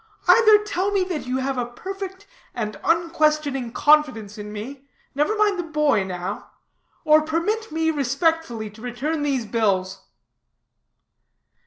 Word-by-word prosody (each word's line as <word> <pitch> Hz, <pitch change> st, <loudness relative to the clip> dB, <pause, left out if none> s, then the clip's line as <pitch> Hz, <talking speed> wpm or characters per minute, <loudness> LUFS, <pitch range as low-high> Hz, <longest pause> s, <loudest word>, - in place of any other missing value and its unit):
Either 435 Hz, -2 st, +7 dB
tell 395 Hz, -1 st, -1 dB
me 395 Hz, -2 st, +2 dB
that 350 Hz, -8 st, -4 dB
you 255 Hz, +1 st, -1 dB
have 265 Hz, 0 st, -2 dB
a 245 Hz, -, -1 dB
perfect 385 Hz, +8 st, -7 dB, 0.3 s
and 215 Hz, -3 st, -4 dB
unquestioning 305 Hz, -6 st, +1 dB
confidence 255 Hz, -9 st, +2 dB
in 210 Hz, 0 st, -8 dB
me 260 Hz, +7 st, -8 dB, 0.2 s
(never 300 Hz, +10 st, 0 dB
mind 415 Hz, -3 st, +2 dB
the -, -, -1 dB
boy 300 Hz, -, +1 dB
now) 185 Hz, +1 st, -5 dB, 0.6 s
or 310 Hz, 0 st, +6 dB
permit 335 Hz, +8 st, -2 dB
me 320 Hz, +1 st, +1 dB
respectfully 280 Hz, -4 st, 0 dB
to 210 Hz, +1 st, -13 dB
return 260 Hz, +6 st, -3 dB
these 275 Hz, -5 st, -1 dB
bills." 195 Hz, -4 st, -1 dB
290 Hz, 135 wpm, -23 LUFS, 235-330 Hz, 0.6 s, Either